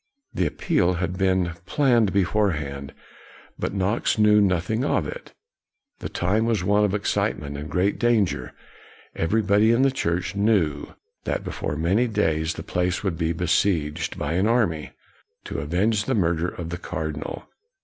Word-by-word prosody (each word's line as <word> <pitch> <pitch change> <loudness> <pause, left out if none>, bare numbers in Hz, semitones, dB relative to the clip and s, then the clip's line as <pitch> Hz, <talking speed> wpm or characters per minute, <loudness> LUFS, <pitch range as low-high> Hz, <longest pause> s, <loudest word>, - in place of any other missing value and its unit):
The 90 - +1
appeal 90 +4 +1
had 90 +1 -2
been 95 -2 +1 0.2
planned 120 -6 +3
beforehand, 80 -9 0 0.7
but - - -2
Knox 100 +5 0
knew 105 -1 +5
noth 90 -1 +1
ing 110 +3 0
of - - +1
it. - - -9 0.6
The - - -5
time 105 +6 0
was 110 -6 0
one 105 +2 +3
of 105 -1 +1
excitement 75 -7 -1
and 75 +2 -6
great 95 +3 0
danger. 115 -6 +1 0.6
Everybody 105 +4 +3
in 120 +3 +3
the 135 - +4
church 90 -5 -2
knew 100 -9 +1 0.3
that - - -2
before 75 - -4
many 95 +10 +2
days 80 -7 0
the - - -6
place 90 +1 -1
would 95 -4 -1
be 80 -1 +1
besieged, 80 -3 0
by - - -2
an 95 +5 +2
army, 105 -10 +1 0.5
to - - -5
avenge 100 +9 0
the 130 - 0
murder 85 -3 +1
of 85 -2 -6
the 85 +1 -5
cardinal. 80 -3 -5
95 Hz, 155 wpm, -24 LUFS, 80-105 Hz, 0.7 s, knew